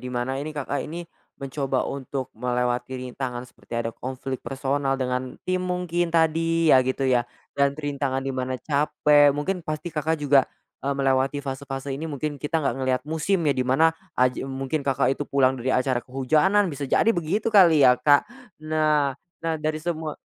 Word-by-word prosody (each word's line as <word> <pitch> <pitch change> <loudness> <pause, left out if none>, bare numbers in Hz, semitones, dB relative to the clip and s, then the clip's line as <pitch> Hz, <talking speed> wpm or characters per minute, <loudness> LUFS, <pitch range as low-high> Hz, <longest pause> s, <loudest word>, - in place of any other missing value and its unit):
di 125 - -6
mana 125 +2 -2
ini 155 +1 -6
Kakak 145 0 -2
ini 170 +2 -6 0.4
mencoba 135 -1 -1
untuk 135 -1 -5
melewati 125 +1 -1
rintangan 125 -1 -5
seperti - - -19
ada 115 0 -1
konflik 130 +1 -5
personal 135 0 -1
dengan 125 -1 -3
tim 185 0 0
mungkin 180 -1 -1
tadi 165 0 +3
ya 130 - +7
gitu 130 +1 -1
ya, 125 -2 +2 0.3
dan 140 0 +2
rintangan 140 -3 -2
di 135 - -2
mana 130 0 -2
capek, 145 +1 +3
mungkin 180 +5 -2
pasti 155 +3 -4
Kakak 160 +1 0
juga, 140 -2 +4 0.4
eee, 140 - +1
melewati 135 +1 +1
fase-fase 135 0 -5
ini 155 - -5
mungkin 145 0 -3
kita 160 +3 -1
nggak 120 - +1
ngelihat 130 -1 0
musim 160 +4 0
ya, - - +4
di - - +1
mana 135 +6 +4 0.3
aji 125 0 +1
mungkin 135 +3 -2
Kakak 135 -1 +2
itu 145 - -3
pulang 135 -2 +3
dari 125 - -3
acara 130 -1 +1
kehujanan 155 +11 +2
bisa 140 0 -4
jadi 220 - +3
begitu 190 +6 -1
kali 170 -8 +7
ya, 125 -1 +6
Kak? 145 +2 +5 0.4
Nah 155 -3 +2 0.3
nah, 165 0 -1
dari 155 0 -1
semua 160 -2 -3
140 Hz, 175 wpm, -24 LUFS, 130-155 Hz, 0.4 s, ya